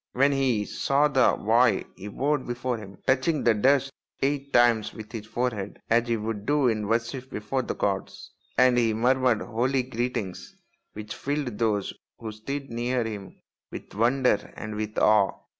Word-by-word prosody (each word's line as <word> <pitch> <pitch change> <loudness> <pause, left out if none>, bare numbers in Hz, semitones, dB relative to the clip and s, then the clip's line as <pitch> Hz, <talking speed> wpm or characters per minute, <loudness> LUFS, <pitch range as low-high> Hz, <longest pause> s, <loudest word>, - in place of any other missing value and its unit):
When 140 +3 +3
he 130 -6 +1
saw 140 +7 +2
the 130 -3 +3
boy 115 -1 +3
he 100 - -9
bowed 140 +6 -1
before 120 +1 -2
him, 100 -3 -11
touching 135 +4 +2
the 120 - +5
dust 135 +5 +2 0.3
eight 140 0 -1
times 120 -4 +3
with 110 -1 -9
his 110 -2 -7
forehead 110 -4 -3
as 120 +1 +3
he 115 -1 +1
would 105 -1 -4
do 145 -2 +3
in 110 -2 -1
worship 120 +4 -2
before 105 +4 -2
the - - -4
gods; 95 -2 -3 0.3
and 125 -1 +5
he 115 -2 +2
murmured 125 0 +2
holy 125 +4 0
greetings 120 -6 -4 0.4
which 105 0 -7
filled 140 -6 -3
those 105 -4 0 0.2
who 110 -2 -6
stood 135 +5 -6
near 120 +1 0
him 105 -4 -7 0.3
with - - -9
wonder 120 +1 +1
and 110 0 -6
with 105 0 -4
awe. 105 -2 +4
120 Hz, 165 wpm, -26 LUFS, 110-130 Hz, 0.4 s, the